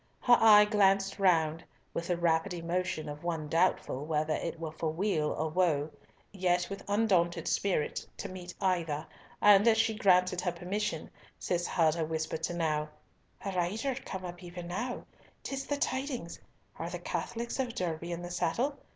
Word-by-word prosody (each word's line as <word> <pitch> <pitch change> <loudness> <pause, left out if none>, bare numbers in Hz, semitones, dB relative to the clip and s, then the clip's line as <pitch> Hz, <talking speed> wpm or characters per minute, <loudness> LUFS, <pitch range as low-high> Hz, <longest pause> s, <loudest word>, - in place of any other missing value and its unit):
Her 245 - +6
eye 210 -2 +8
glanced 195 -1 +2
round 165 -4 +3 0.3
with 170 - -3
the 175 - 0
rapid 170 +2 +1
emotion 170 -2 -2
of 145 +1 -7
one 165 -3 -2
doubtful 165 -4 +1
whether 155 0 0
it 170 0 -3
were 160 -2 -4
for 160 0 -2
weal 160 -2 0
or 160 - -1
woe, 155 -3 +1 0.4
yet 180 -2 0
with 195 - -6
undaunted 185 -6 +2
spirit 185 -7 0
to - - -5
meet 180 -1 -8
either, 165 -6 0 0.4
and 205 +1 +7
as 225 -1 +6
she 225 0 +2
granted 180 -3 +3
her 180 - 0
permission, 175 0 -3 0.3
Cis 175 -1 -1
heard 160 -3 +3
her 165 -1 -1
whisper 160 0 -2
to 160 +2 -3
Nau, 155 -3 0 0.6
"A 195 - -1
rider 195 +9 -1
came 190 -7 -6
up 175 0 -7
even 175 -1 -8
now! 245 +8 -3 0.4
'Tis 270 0 -4
the 285 - -1
tidings! 260 - -2 0.4
Are 165 - -3
the 175 - -4
Catholics 230 +9 -4
of 250 -3 -1
Derby 170 -1 -3
in 170 0 -4
the 175 - -6
saddle? 255 - -1
175 Hz, 170 wpm, -31 LUFS, 165-200 Hz, 0.6 s, eye